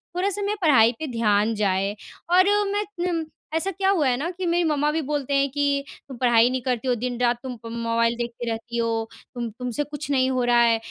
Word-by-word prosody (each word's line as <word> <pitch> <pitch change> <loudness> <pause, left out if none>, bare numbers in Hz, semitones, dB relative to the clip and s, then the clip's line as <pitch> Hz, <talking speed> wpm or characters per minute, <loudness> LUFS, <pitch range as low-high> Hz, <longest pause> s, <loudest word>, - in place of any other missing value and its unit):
थोड़ा-सा 395 +3 0
मैं 405 +1 -1
पढ़ाई 260 -9 +5
पे 315 - -3
ध्यान 215 -1 +2
जाए। 200 -1 0 0.4
और 370 +1 +7 0.3
मैं 410 +1 0 0.2
नम 335 -2 -1 0.3
ऐसा 380 +4 0
क्या 385 +1 0
हुआ 340 -8 +2
है 245 -1 +2
ना 305 +6 -2
कि 370 +1 -5
मेरी 345 0 +2
मम्मा 295 0 +1
भी 320 +1 -1
बोलते 285 -1 -2
हैं 275 0 +2
कि 280 0 0 0.2
तुम 265 -3 -9
पढ़ाई 240 -1 +4
नहीं 255 0 -2
करती 250 0 -2
हो, 250 - +2
दिन-रात 245 0 0
तुम 255 -2 -5
प - - -7
मोबाइल 230 0 0
देखती 240 0 -4
रहती 230 +1 -4
हो, 225 -1 -1 0.3
तुम 240 -1 -3
तुमसे 250 +3 -2
कुछ 295 0 -7
नहीं 260 -1 +2
हो 255 -1 0
रहा 240 0 +4
है। 230 -1 +4
250 Hz, 220 wpm, -24 LUFS, 230-300 Hz, 0.4 s, और